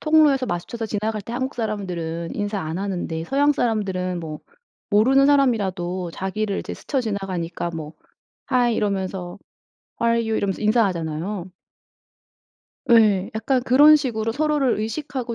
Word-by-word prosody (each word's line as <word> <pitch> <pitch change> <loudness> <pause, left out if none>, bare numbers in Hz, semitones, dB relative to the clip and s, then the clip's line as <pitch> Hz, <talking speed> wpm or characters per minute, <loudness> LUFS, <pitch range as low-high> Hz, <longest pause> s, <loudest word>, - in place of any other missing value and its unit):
통로에서 300 -4 +4
마주쳐서 220 +6 -4
지나갈 215 0 -2
때 230 - -8
한국 260 +2 -2
사람들은 180 -7 -3
인사 205 -1 -2
안 160 +2 -4
하는데 175 -4 -3
서양 285 +7 +2
사람은 190 -8 -1
뭐 155 -2 -6 0.5
모르는 260 +7 +5
사람이라도 190 -11 +1
자기를 200 +1 -2
이제 - - -7
스쳐 275 - -2
지나가니까 185 -6 -3
뭐 155 -1 -6 0.6
Hi. 245 -2 +3
이러면서 190 -3 -2 0.6
How 235 0 +3
are 230 - 0
you? 220 - +1
이러면서 195 0 -2
인사하잖아요. 185 -4 0 1.4
예. 210 -5 +5
약간 245 +3 0
그런 290 +4 +7
식으로 225 -6 -2
서로를 290 -1 +1
의식하고 250 +1 -4
215 Hz, 355 characters per minute, -22 LUFS, 185-245 Hz, 1.4 s, 그런